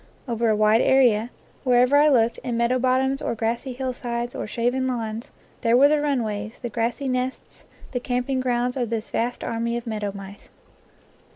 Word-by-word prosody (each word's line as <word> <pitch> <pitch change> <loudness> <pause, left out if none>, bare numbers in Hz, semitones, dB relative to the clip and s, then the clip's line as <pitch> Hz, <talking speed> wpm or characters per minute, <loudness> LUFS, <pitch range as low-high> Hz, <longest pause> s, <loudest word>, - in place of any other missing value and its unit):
Over 235 -1 0
a 215 - +3
wide 215 +2 +4
area, 240 -4 +4 0.3
wherever 250 +1 +4
1 300 0 +5
looked 235 -3 +2
in 240 -3 -3
meadow 235 +2 +2
bottoms 260 +2 +1
or - - -2
grassy 235 +4 -2
hillsides 245 -2 -3
or - - -5
shaven 245 +4 0
lawns, 230 -2 -4 0.3
there 235 0 +4
were 280 +2 +7
the 300 -1 +2
runways, 220 -7 -2
the 240 - -5
grassy 235 +4 -2
nests, 255 0 -3 0.3
the 245 - -1
camping 250 +1 -1
grounds 250 -1 0
of 245 -4 -2
this 225 -1 -4
vast 240 +2 -2
army 235 +1 -2
of 240 - -6
meadow 210 -3 -3
mice. 195 0 -11
240 Hz, 175 wpm, -24 LUFS, 230-255 Hz, 0.3 s, were